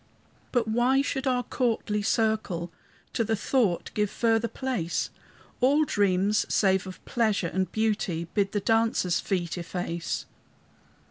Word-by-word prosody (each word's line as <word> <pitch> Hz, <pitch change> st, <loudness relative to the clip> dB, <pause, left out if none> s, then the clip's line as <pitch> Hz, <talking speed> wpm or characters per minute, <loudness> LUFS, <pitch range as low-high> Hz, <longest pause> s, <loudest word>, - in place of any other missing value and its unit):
"But 240 Hz, -3 st, +1 dB
why 245 Hz, +5 st, +3 dB
should 270 Hz, -1 st, -2 dB
our 250 Hz, -1 st, +2 dB
courtly 225 Hz, -5 st, -1 dB
circle 215 Hz, -6 st, 0 dB, 0.4 s
To 230 Hz, -, +1 dB
the 225 Hz, 0 st, 0 dB
thought 210 Hz, -4 st, 0 dB
give 210 Hz, -1 st, +1 dB
further 230 Hz, +1 st, +1 dB
place? 235 Hz, -11 st, -2 dB, 0.5 s
All 285 Hz, +5 st, +4 dB
dreams, 200 Hz, -3 st, +2 dB
save 190 Hz, -2 st, +2 dB
of 185 Hz, -, -10 dB
pleasure 215 Hz, -7 st, +1 dB
and 190 Hz, 0 st, 0 dB
beauty, 205 Hz, -6 st, -1 dB
Bid 200 Hz, -2 st, +1 dB
the 205 Hz, -, -1 dB
dancers' 225 Hz, -5 st, +2 dB
feet 180 Hz, -3 st, -2 dB
efface." 170 Hz, -1 st, -3 dB
215 Hz, 130 wpm, -27 LUFS, 185-235 Hz, 0.5 s, All